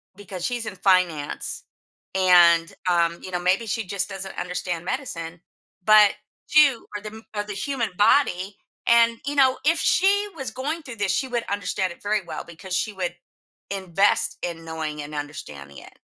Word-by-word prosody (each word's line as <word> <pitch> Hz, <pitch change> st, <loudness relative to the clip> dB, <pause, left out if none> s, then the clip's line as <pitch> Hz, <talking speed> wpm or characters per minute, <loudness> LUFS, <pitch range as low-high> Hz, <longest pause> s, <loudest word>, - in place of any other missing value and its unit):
because 190 Hz, -3 st, -6 dB
she's 240 Hz, -2 st, -2 dB
in 195 Hz, -, -6 dB
finance 180 Hz, -6 st, 0 dB, 0.5 s
and, 175 Hz, -3 st, +5 dB, 0.2 s
um, 170 Hz, -1 st, +2 dB
you 185 Hz, -, -7 dB
know, 180 Hz, -, -1 dB
maybe 185 Hz, +5 st, +1 dB
she 225 Hz, +1 st, -2 dB
just 195 Hz, +1 st, -2 dB
doesn't 195 Hz, -1 st, -7 dB
understand 180 Hz, -1 st, -3 dB
medicine, 175 Hz, -, -5 dB, 0.4 s
but 210 Hz, 0 st, +7 dB, 0.4 s
2, 290 Hz, -5 st, +5 dB
or 205 Hz, -, -4 dB
them 215 Hz, +1 st, -9 dB
or 205 Hz, -, -1 dB
the 210 Hz, 0 st, -6 dB
human 255 Hz, 0 st, -2 dB
body, 205 Hz, -4 st, +3 dB, 0.3 s
and, 230 Hz, 0 st, +5 dB
you 285 Hz, -, -2 dB
know, 265 Hz, -2 st, +4 dB
if 330 Hz, +2 st, +3 dB
she 400 Hz, +5 st, +3 dB
was 270 Hz, -4 st, -5 dB
going 305 Hz, +5 st, -4 dB
through 255 Hz, -5 st, -9 dB
this, 205 Hz, -2 st, 0 dB
she 265 Hz, +7 st, 0 dB
would 240 Hz, -2 st, -2 dB
understand 190 Hz, -2 st, -1 dB
it -, -, -21 dB
very 210 Hz, 0 st, +1 dB
well -, -, -6 dB
because 180 Hz, +2 st, -6 dB
she 215 Hz, -, -1 dB
would 180 Hz, -2 st, -3 dB, 0.6 s
invest 195 Hz, 0 st, +1 dB
in 165 Hz, -1 st, -4 dB
knowing 155 Hz, -2 st, -4 dB
and 145 Hz, +1 st, -8 dB
understanding 75 Hz, -, -7 dB
it. -, -, -16 dB
195 Hz, 170 wpm, -24 LUFS, 175-230 Hz, 0.6 s, but